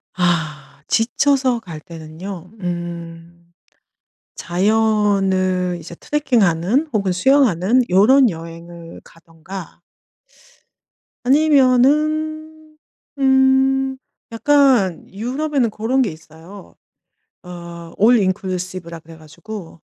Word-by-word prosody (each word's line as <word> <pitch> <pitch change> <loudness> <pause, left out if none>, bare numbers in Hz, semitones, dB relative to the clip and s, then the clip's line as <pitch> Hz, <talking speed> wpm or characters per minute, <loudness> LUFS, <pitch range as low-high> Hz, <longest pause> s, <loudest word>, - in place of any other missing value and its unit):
아. 165 -5 -1 0.3
지쳐서 255 +2 +1
갈 170 -8 -9
때는요. 170 +2 -9
음. 170 -1 -7 0.8
자연을 190 -2 +1
이제 170 +1 -10
트레킹하는 240 - 0
혹은 200 -3 0
수영하는 235 - +3
요런 240 +7 +5
여행을 165 0 -10
가든가 165 +2 -12 1.4
아니면은 310 +3 +1 0.4
음. 265 0 +2 0.3
약간 255 - +2
유럽에는 260 +3 -1
고런 230 +5 -1
게 215 -9 0
있어요. 165 +5 -14 0.7
어 170 -1 -10
올인클루시브라고 185 -6 0
그래 165 0 -14
가지고. 165 +2 -11
195 Hz, 190 characters per minute, -19 LUFS, 170-265 Hz, 1.4 s, 요런